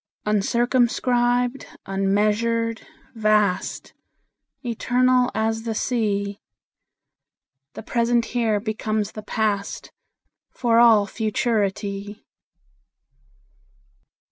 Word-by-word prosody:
Uncircumscribed, 245 +3 +1 0.2
unmeasured, 210 +4 0 0.3
vast, 215 -4 0 0.7
Eternal 250 +2 +2
as 225 0 0
the 225 -1 -4
Sea, 205 -4 -1 1.3
The - - -8
present 235 0 +1
here 225 -4 +1
becomes 215 -1 -2
the 215 - -8
past, 210 -2 -2 0.6
For 235 -2 +1
all 225 -4 +6
futurity. 205 -2 -2
220 Hz, 65 wpm, -23 LUFS, 205-240 Hz, 1.3 s, all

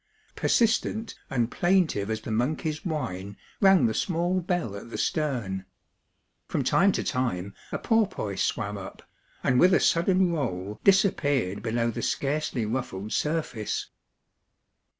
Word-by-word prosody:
Persistent 225 -1 +1 0.2
and 120 -3 0
plaintive 175 - +2
as 110 0 -2
the 110 - -6
monkey's 150 +7 -1
whine 100 - -4 0.2
rang 195 -2 +6
the 110 - +1
small 175 - 0
bell 175 - -2
at 105 +3 -9
the - - -5
stern. 115 -12 -1 0.8
From - - -1
time 195 +2 +4
to - - -1
time 100 -8 -2 0.2
a - - -1
porpoise 195 - 0
swam 105 -1 -1
up, 95 - -10 0.4
and 125 0 +3
with 185 +1 +6
a - - +4
sudden 180 +1 +3
roll 105 - -3
disappeared 145 - +2
below 115 +1 0
the - - -5
scarcely 140 -4 -1
ruffled 110 -3 -3
surface. 150 -9 -2
130 Hz, 130 wpm, -27 LUFS, 105-175 Hz, 0.8 s, rang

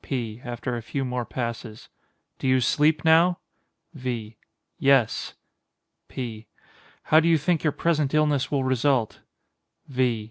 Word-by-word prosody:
P. 120 -4 -4
[After 120 +1 -4
a 120 - -4
few 135 +4 -3
more 125 -1 -3
passes.] 115 -1 -6 0.5
Do - - -2
you 130 0 +4
sleep 150 +5 +2
now? 170 +2 +5 0.6
V. 120 -6 -5 0.4
Yes. 135 -5 +2 0.7
P. 115 -4 -6 0.6
How 155 - +5
do 165 - +1
you 165 -1 +5
think 160 +2 0
your 155 - +2
present 150 -3 0
illness 145 -4 +2
will 140 -2 0
result? 130 -2 +1 0.7
_V. 130 -2 -3
130 Hz, 135 wpm, -25 LUFS, 120-150 Hz, 0.7 s, now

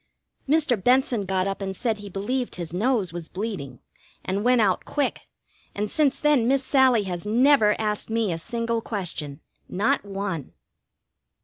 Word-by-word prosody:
Mr. 285 - +2
Benson 250 -3 +2
got 185 0 0
up 195 0 -3
and 190 -1 -3
said 220 0 -1
he 205 0 -8
believed 240 +7 -2
his 170 -2 -6
nose 205 -3 0
was 170 -2 -7
bleeding, 185 - -5 0.5
and 195 +2 -1
went 250 0 +4
out 195 -4 +2
quick, 290 -2 -2 0.5
and 205 +1 -2
since 290 -3 +2
then 295 -6 +3
Miss 270 +1 +2
Sallie 260 -5 +4
has 180 0 -5
never 235 -1 +4
asked 210 -1 -2
me 225 -3 0
a 165 - -4
single 230 +4 -2
question. 165 -9 -4 0.3
Not 205 +5 +1
one. 195 -7 -4
210 Hz, 155 wpm, -25 LUFS, 190-250 Hz, 0.5 s, went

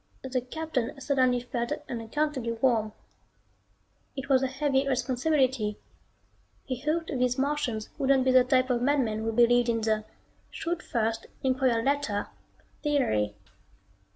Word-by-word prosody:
The 260 -1 -1
Captain 270 -1 -3
suddenly 255 -3 +2
felt 240 -1 -3 0.2
unaccountably 245 +1 -2
warm. 225 -3 +1 1.2
It 270 +1 -6
was 265 -1 +5
a 265 - +1
heavy 270 0 0
responsibility 260 -3 +1 0.9
he 255 -2 -4
hoped 320 +3 -1
these 250 0 +1
Martians 265 -6 -1
wouldn't 270 -1 +3
be 260 - +4
the 255 -1 +6
type 255 0 +2
of 240 -1 +1
madmen 250 -5 +1
who 225 +1 -1
believed 240 +1 +4
in 230 -1 +1
the 215 -1 0 0.4
"shoot 340 0 -3
first, 225 -1 -2 0.2
inquire 255 -3 +2
later" 275 -7 0 0.5
theory. 110 - +1
255 Hz, 125 wpm, -28 LUFS, 230-275 Hz, 1.2 s, the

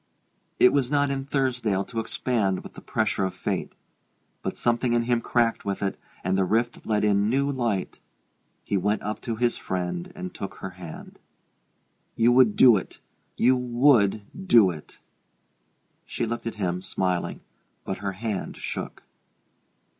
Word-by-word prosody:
It 125 - +6
was 135 -3 +2
not 145 -1 +2
in 135 -1 -3
Thursdale 125 -8 0
to 115 - -4
expand 110 -4 -1
with - - -11
the - - -11
pressure - - 0
of 95 - -2
fate; - - -3 0.7
but - - -4
something 120 0 +1
in 120 0 +2
him 120 0 +1
cracked 115 -1 +1
with 100 0 -3
it, 95 - -1 0.3
and 95 +1 +1
the 95 - +3
rift 115 +5 -1
let 105 -1 +1
in 100 0 +3
new 140 +3 +1
light. 115 -8 -2 0.6
He 100 - 0
went 105 +3 0
up 105 +1 -4
to 115 - -3
his 120 +1 +1
friend 95 - -3
and 185 -2 -6
took 100 - -6
her 95 - -7
hand. 90 -3 -10 1.0
"You 115 +1 +4
would 120 -4 +5
do 120 -5 +7
it - - -7 0.4
you 130 +2 +4
would 120 -4 +3 0.2
do 110 - +6
it!" 75 -3 -11 1.1
She - - -2
looked 115 +1 -4
at 115 - -4
him, 90 -3 -2
smiling, 90 -1 -2 0.4
but 95 - -4
her 100 0 -3
hand 105 0 -4
shook. - - -6
115 Hz, 160 wpm, -26 LUFS, 95-125 Hz, 1.1 s, do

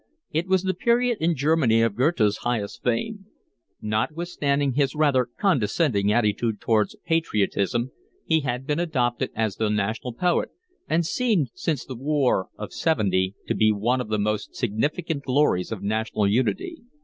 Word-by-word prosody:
It 165 +4 -1
was 190 -1 +2
the 190 0 0
period 240 +1 +1
in 165 +1 +2
Germany 135 -6 +3
of 115 -3 0
Goethe's 120 -6 +2
highest 120 -1 -3
fame. 195 - -2 0.6
Notwithstanding 140 +4 -1
his 140 +2 +1
rather 140 -5 +2
condescending 120 - +1
attitude 110 0 +1
towards 110 -2 +1
patriotism 120 - 0 0.3
he 160 -1 +3
had 130 -2 -3
been 150 +3 -1
adopted 125 -8 0
as 110 -3 -1
the 110 -1 0
national 110 +4 -2
poet, 175 +7 +1 0.4
and 165 +2 +2
seemed 190 - +1
since 155 -6 -2
the 130 - -7
war 135 -6 +1
of 105 - -7
seventy 95 - +1
to - - -1
be 110 0 +3
one 120 +5 0
of 125 - -5
the 110 - +1
most 105 +1 -2
significant 145 - -1
glories 130 -10 +1
of 105 -3 -5
national 110 0 0
unity. 320 - 0
125 Hz, 150 wpm, -24 LUFS, 110-160 Hz, 0.6 s, Germany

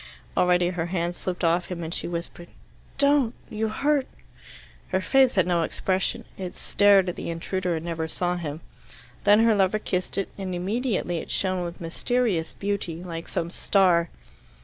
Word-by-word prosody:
Already 180 -1 +3
her 175 -2 -2
hands 175 -1 -1
slipped 180 0 -4
off 170 +1 +2
him, 175 -2 -5
and 160 +1 -4
she - - -2
whispered, 170 0 -5 0.5
"Don't 280 -4 +3 0.2
you 220 +1 -1
hurt 280 +5 +1 0.4
" - - -20
Her 185 - 0
face 260 +5 +4
had 185 - +4
no 175 -1 +2
expression. 185 +3 -1
It 185 -2 -5
stared 200 -2 +4
at 180 - -2
the - - -5
intruder 175 +1 -2
and 160 +1 -4
never 165 -1 -2
saw 180 +2 -1
him. 160 -2 -5 0.6
Then 205 +2 +7
her 230 -1 +5
lover 195 0 +3
kissed 185 -3 -2
it, 195 - -1
and 185 -2 -3
immediately 190 -2 -1
it - - -8
shone 185 -2 0
with 170 0 -6
mysterious 180 +1 0
beauty, 195 -4 -3
like 165 -2 -6
some 170 +1 -2
star. 180 -4 +3
180 Hz, 170 wpm, -25 LUFS, 170-205 Hz, 0.6 s, Then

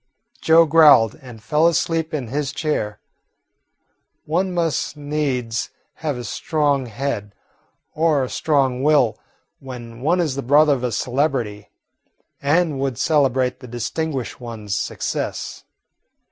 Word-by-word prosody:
Joe 165 +1 +6
growled 150 -8 +6
and 120 -5 -12
fell 155 +4 +3
asleep 165 -1 0
in 140 -8 -3
his 145 +2 -2
chair. 145 -9 -2 1.3
One 180 +5 0
must 165 -4 -1
needs 135 -6 -2 0.3
have 150 -5 -2
a 120 - -6
strong 145 +1 0
head 110 -4 -4 0.6
or 155 -3 +2
a - - -2
strong 135 -5 +1
will 145 -6 +3 0.4
when 120 -3 -9
one 165 +6 +2
is 160 -6 0
the 140 - -3
brother 145 +3 +5
of 125 -3 -3
a 125 - 0
celebrity 125 -4 -1 0.7
and 150 0 +1
would 135 -3 -2
celebrate 130 -5 +1
the 125 - -11
distinguished 130 +3 -4
one's 110 -4 -5
success. - - -4
140 Hz, 125 wpm, -21 LUFS, 120-155 Hz, 1.3 s, Joe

